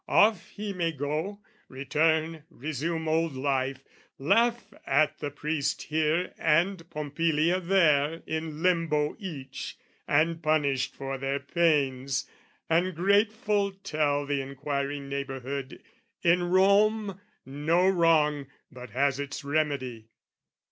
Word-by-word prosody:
"Off 210 Hz, -4 st, +3 dB
he 205 Hz, -1 st, -5 dB
may 170 Hz, -3 st, -1 dB
go, 155 Hz, +7 st, -3 dB, 0.3 s
return, 160 Hz, +4 st, 0 dB
resume 160 Hz, +2 st, -3 dB
old 160 Hz, -2 st, +1 dB
life, 135 Hz, 0 st, -1 dB, 0.3 s
"Laugh 235 Hz, -, +1 dB
at 145 Hz, +2 st, +2 dB
the 145 Hz, -, -3 dB
priest 145 Hz, 0 st, -2 dB
here 160 Hz, +3 st, 0 dB
and 165 Hz, +2 st, +1 dB
Pompilia 155 Hz, +3 st, 0 dB
there 165 Hz, -4 st, +2 dB
"In 160 Hz, 0 st, -4 dB
limbo 165 Hz, -5 st, +1 dB
each 155 Hz, -10 st, -7 dB, 0.3 s
and 160 Hz, +3 st, +2 dB
punished 145 Hz, -5 st, +1 dB
for 135 Hz, 0 st, -5 dB
their 135 Hz, +1 st, -1 dB
pains, 140 Hz, -4 st, +1 dB, 0.4 s
"And 175 Hz, +2 st, +1 dB
grateful 205 Hz, +2 st, +2 dB
tell 150 Hz, -7 st, -1 dB
the 140 Hz, -1 st, -1 dB
inquiring 140 Hz, +1 st, -3 dB
neighbourhood 140 Hz, -1 st, -5 dB, 0.4 s
"In 175 Hz, +1 st, +3 dB
Rome, 200 Hz, +2 st, +3 dB, 0.2 s
no 155 Hz, +7 st, +1 dB
wrong 155 Hz, -6 st, +3 dB, 0.2 s
but 125 Hz, -1 st, -10 dB
has 140 Hz, +1 st, +1 dB
its 145 Hz, +1 st, -5 dB
remedy." 140 Hz, -6 st, -2 dB
155 Hz, 110 wpm, -28 LUFS, 140-170 Hz, 0.4 s, Off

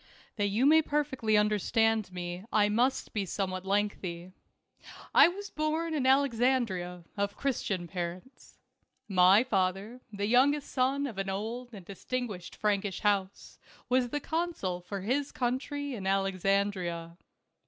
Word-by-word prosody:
HAT 205 Hz, 0 st, +2 dB
you 220 Hz, +6 st, +1 dB
may 315 Hz, +2 st, +7 dB
perfectly 275 Hz, -8 st, 0 dB
understand 215 Hz, 0 st, +2 dB
me 175 Hz, 0 st, -5 dB
I 205 Hz, -1 st, +3 dB
must 245 Hz, +5 st, 0 dB
be 210 Hz, -, -1 dB
somewhat 185 Hz, 0 st, -3 dB
lengthy. 190 Hz, -3 st, -2 dB, 0.8 s
I -, -, +8 dB
was 395 Hz, +3 st, -6 dB
born 315 Hz, +2 st, -1 dB
in 275 Hz, -4 st, 0 dB
Alexandria, 240 Hz, -9 st, +1 dB
of 200 Hz, -1 st, -2 dB
Christian 205 Hz, -10 st, -2 dB
parents. 180 Hz, +7 st, -7 dB, 0.5 s
My 190 Hz, +2 st, +6 dB
father, 200 Hz, +1 st, -1 dB
the 200 Hz, -1 st, -3 dB
youngest 275 Hz, +6 st, +3 dB
son 270 Hz, +2 st, +1 dB
of 225 Hz, -8 st, -5 dB
an 195 Hz, 0 st, -2 dB
old 230 Hz, +6 st, -4 dB
and 200 Hz, -6 st, -11 dB
distinguished 205 Hz, -2 st, -5 dB
Frankish 205 Hz, -2 st, -1 dB
house, 200 Hz, -2 st, -1 dB, 0.3 s
was 250 Hz, -1 st, +2 dB
the 295 Hz, -, -2 dB
consul 315 Hz, -, -2 dB
for 195 Hz, +2 st, -6 dB
his 270 Hz, +8 st, -1 dB
country 270 Hz, +3 st, -2 dB
in 195 Hz, -5 st, -5 dB
Alexandria. 195 Hz, -3 st, 0 dB
210 Hz, 130 wpm, -30 LUFS, 190-260 Hz, 0.8 s, I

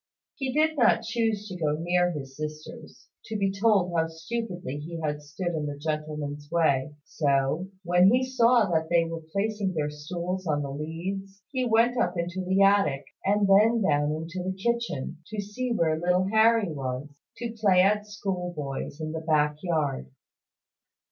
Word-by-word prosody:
He 265 Hz, -2 st, -3 dB
did 310 Hz, +2 st, +2 dB
not 230 Hz, -1 st, +4 dB
choose 225 Hz, -2 st, -1 dB
to 190 Hz, -, -7 dB
go 155 Hz, -4 st, 0 dB
near 175 Hz, +2 st, +2 dB
his 135 Hz, -5 st, -6 dB
sisters, 155 Hz, +1 st, -8 dB, 0.2 s
to 220 Hz, -, -3 dB
be 195 Hz, -1 st, +1 dB
told 195 Hz, -3 st, +2 dB
how 165 Hz, -1 st, +2 dB
stupidly 175 Hz, -, -5 dB
he 165 Hz, +3 st, -6 dB
had 150 Hz, -2 st, -2 dB
stood 150 Hz, +5 st, -4 dB
in 155 Hz, -2 st, -2 dB
the 145 Hz, -1 st, -5 dB
gentleman's 150 Hz, -1 st, -4 dB
way; 150 Hz, -4 st, +1 dB
so, 140 Hz, +4 st, 0 dB, 0.2 s
when 180 Hz, +1 st, +5 dB
he 250 Hz, +4 st, +3 dB
saw 240 Hz, -3 st, +4 dB
that 160 Hz, -1 st, +1 dB
they 170 Hz, -1 st, +3 dB
were 165 Hz, 0 st, -5 dB
placing 200 Hz, -1 st, -1 dB
their 150 Hz, -1 st, -1 dB
stools 175 Hz, +5 st, -4 dB
on 145 Hz, -2 st, +1 dB
the 140 Hz, -, -4 dB
leads, 185 Hz, +6 st, -5 dB
he 260 Hz, -2 st, 0 dB
went 235 Hz, +1 st, +3 dB
up 175 Hz, 0 st, 0 dB
into 175 Hz, +2 st, -2 dB
the 190 Hz, +2 st, +3 dB
attic, 195 Hz, -9 st, +3 dB, 0.2 s
and 205 Hz, +1 st, +2 dB
then 215 Hz, +3 st, +5 dB
down 145 Hz, -3 st, +2 dB
into 165 Hz, +4 st, -5 dB
the 190 Hz, +1 st, -3 dB
kitchen, 215 Hz, -, -2 dB
to 215 Hz, -1 st, -5 dB
see 210 Hz, +5 st, -3 dB
where 160 Hz, -8 st, +1 dB
little 180 Hz, +2 st, +2 dB
Harry 220 Hz, -3 st, +4 dB
was, 130 Hz, 0 st, -4 dB, 0.3 s
to 235 Hz, -1 st, -4 dB
play 195 Hz, -5 st, +4 dB
at 210 Hz, +2 st, +2 dB
schoolboys 180 Hz, -9 st, -4 dB
in 155 Hz, -1 st, -4 dB
the 160 Hz, 0 st, -4 dB
back 150 Hz, -2 st, +2 dB
yard. 150 Hz, -, -1 dB
175 Hz, 170 wpm, -27 LUFS, 155-205 Hz, 0.3 s, when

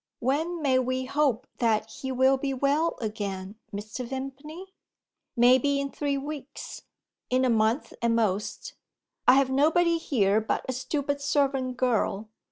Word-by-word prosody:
"When 315 Hz, +6 st, -1 dB
may 260 Hz, -2 st, +3 dB
we 255 Hz, 0 st, -1 dB
hope 270 Hz, -3 st, +1 dB
that 220 Hz, -2 st, +2 dB
he 265 Hz, -, -5 dB
will 260 Hz, +1 st, +4 dB
be 270 Hz, 0 st, -2 dB
well 285 Hz, +5 st, +1 dB
again, 205 Hz, -2 st, -4 dB
Mr. 215 Hz, +5 st, -5 dB
Vimpany?" 275 Hz, +8 st, -7 dB, 0.6 s
"Maybe 260 Hz, +4 st, +4 dB
in 280 Hz, 0 st, -3 dB
three 285 Hz, -1 st, -1 dB
weeks. 285 Hz, 0 st, -7 dB, 0.5 s
In 255 Hz, +1 st, +2 dB
a 250 Hz, -, +3 dB
month 225 Hz, +4 st, +1 dB
at 235 Hz, -, +2 dB
most. 215 Hz, -3 st, -1 dB, 0.5 s
I 255 Hz, -, +8 dB
have 270 Hz, -1 st, +3 dB
nobody 330 Hz, +5 st, +3 dB
here 215 Hz, -8 st, +2 dB
but 220 Hz, -, -2 dB
a 260 Hz, -, -1 dB
stupid 285 Hz, +2 st, -2 dB
servant 270 Hz, -3 st, 0 dB
girl. 225 Hz, -4 st, 0 dB
260 Hz, 145 wpm, -27 LUFS, 230-285 Hz, 0.6 s, I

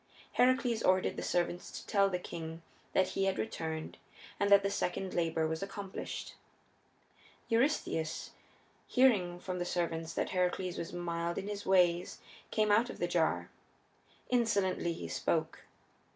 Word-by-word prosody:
Heracles 250 Hz, -2 st, +3 dB
ordered 185 Hz, 0 st, +3 dB
the -, -, -4 dB
servants 175 Hz, 0 st, -1 dB
to -, -, -8 dB
tell 200 Hz, -2 st, +3 dB
the 180 Hz, -, 0 dB
king 165 Hz, -1 st, -7 dB, 0.3 s
that 190 Hz, -1 st, +3 dB
he 195 Hz, -, 0 dB
had 195 Hz, -1 st, +1 dB
returned 160 Hz, -7 st, -4 dB, 0.4 s
and 200 Hz, -, +2 dB
that 200 Hz, -1 st, +7 dB
the 200 Hz, -, 0 dB
second 190 Hz, -1 st, -2 dB
labor 165 Hz, -2 st, +1 dB
was 160 Hz, +2 st, -2 dB
accomplished. 195 Hz, 0 st, -5 dB, 1.2 s
Eurystheus, 230 Hz, -, 0 dB, 0.6 s
hearing 200 Hz, -10 st, +3 dB
from 180 Hz, 0 st, -4 dB
the -, -, 0 dB
servants 165 Hz, -2 st, -2 dB
that -, -, 0 dB
Heracles 180 Hz, 0 st, 0 dB
was 165 Hz, -, -4 dB
mild 170 Hz, -1 st, -2 dB
in 195 Hz, -, -3 dB
his 205 Hz, -1 st, -5 dB
ways, 180 Hz, -2 st, +3 dB, 0.3 s
came 215 Hz, -1 st, +2 dB
out 225 Hz, +4 st, +4 dB
of -, -, -7 dB
the 175 Hz, -, 0 dB
jar. 160 Hz, -, +1 dB, 0.8 s
Insolently 200 Hz, -8 st, +2 dB
he 85 Hz, -, -6 dB
spoke. -, -, -1 dB
180 Hz, 145 wpm, -33 LUFS, 170-200 Hz, 1.2 s, that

